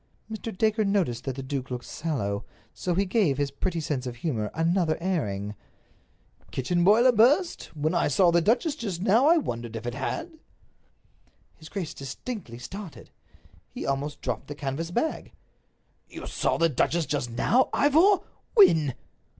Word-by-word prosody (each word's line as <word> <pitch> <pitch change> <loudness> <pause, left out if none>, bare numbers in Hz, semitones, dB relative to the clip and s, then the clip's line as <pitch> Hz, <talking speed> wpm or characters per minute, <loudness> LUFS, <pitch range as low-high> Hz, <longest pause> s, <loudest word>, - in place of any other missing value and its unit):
Mr. 220 -2 -6
Dacre 220 0 +2
noticed 185 - 0
that 135 -2 -3
the 135 - -6
duke 130 -1 -4
looked 125 -1 -5
sallow, 105 -11 -3 0.3
so 180 -2 -2
he 195 +3 +2
gave 185 - +2
his 145 -1 -1
pretty 170 +4 -2
sense 145 -5 -2
of 120 - -5
humor 115 -5 -2
another 165 0 +1
airing. 105 - -2 1.0
"Kitchen 175 +7 0
boiler 225 +7 +6
burst? 275 - +3
When 155 +3 0
I 170 - +2
saw 175 +5 +4
the 170 0 +4
duchess 250 - +2
just 200 - -4
now 225 +8 +4
I 335 +2 +6
wondered 120 - -3
if 115 +1 -6
it 120 - -3
had." 320 - -4 1.2
His 155 - -13
grace 185 -6 -4
distinctly 135 - -7
started. 180 +8 -9 0.6
He - - -6
almost 140 +2 -2
dropped - - -3
the 145 - -6
canvas 145 +4 -3
bag. 240 - -2 0.8
"You - - -8
saw - - 0
the 165 - +4
duchess 165 +3 +1
just 140 -5 -2
now, 235 - +2
Ivor! 330 +8 +4 0.3
When?" 160 - +6
165 Hz, 160 wpm, -26 LUFS, 135-215 Hz, 1.2 s, boiler